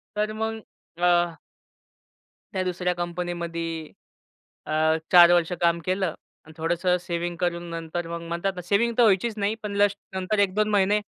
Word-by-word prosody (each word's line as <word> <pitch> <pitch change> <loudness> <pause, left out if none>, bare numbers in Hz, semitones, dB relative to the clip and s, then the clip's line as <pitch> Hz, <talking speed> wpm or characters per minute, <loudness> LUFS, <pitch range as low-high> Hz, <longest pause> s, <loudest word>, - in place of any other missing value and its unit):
तर 210 +1 0
मग 220 +1 -3 0.4
अ 175 -2 +3 1.1
त्या 190 -1 0
दुसऱ्या 180 0 -1
कंपनीमध्ये 170 -2 -4 0.8
अ, - - -4 0.4
4 175 -1 +9
वर्ष 175 -1 +2
काम 170 0 +3
केलं 185 +1 0 0.4
आणि 160 - -14
थोडंसं 175 +2 +1
सेव्हिंग 175 0 -3
करून 175 -1 -1
नंतर 165 +1 -4
मग 170 0 -5
म्हणतात 170 +3 -1
ना, 180 - -5
सेव्हिंग 210 +6 +1
तर - - +7
व्हायचीच 215 +1 +3
नाही. 205 +2 0
पण 205 -1 -4
जस्ट 205 0 +3 0.2
नंतर 190 +3 -1
1-2 205 +2 +2
महिने 205 0 +3
180 Hz, 150 wpm, -25 LUFS, 170-200 Hz, 1.1 s, 4